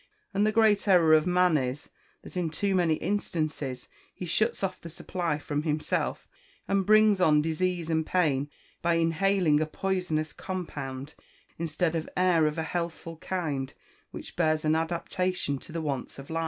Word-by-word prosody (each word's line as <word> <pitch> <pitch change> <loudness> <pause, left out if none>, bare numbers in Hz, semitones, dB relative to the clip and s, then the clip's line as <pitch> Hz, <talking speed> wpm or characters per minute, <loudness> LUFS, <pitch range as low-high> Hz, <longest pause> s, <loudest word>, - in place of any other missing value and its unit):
And 205 +2 +2
the - - +3
great 215 -2 +3
error 170 -5 +6
of 155 +2 +4
man 180 -2 +4
is, 130 +2 -4 0.3
that - - -11
in 175 -3 0
too 195 +5 -1
many 175 -4 +3
instances, 155 -9 -3 0.2
he 180 - -7
shuts 215 +6 0
off 185 -1 -2
the 170 - -8
supply 170 -1 -2
from 145 0 -3
himself, 155 -1 -1 0.4
and 195 -1 +1
brings 215 -2 +5
on 150 -4 +5
disease 170 +1 -1
and 160 -1 +1
pain 145 -5 +1 0.3
by 170 0 +2
inhaling 165 -1 +2
a 155 - 0
poisonous 175 -3 -2
compound, 145 -7 -5 0.5
instead 165 +1 -1
of 160 -1 -3
air 175 -4 +4
of 150 - -3
a 160 - -1
healthful 170 0 -4
kind, 155 -7 -3 0.3
which - - -9
bears 155 -2 +1
an 155 - +3
adaptation 170 -1 -1
to - - -12
the 165 0 -3
wants 140 -4 -3
of 135 +3 -10
life. 165 - -1
165 Hz, 165 wpm, -28 LUFS, 155-185 Hz, 0.5 s, error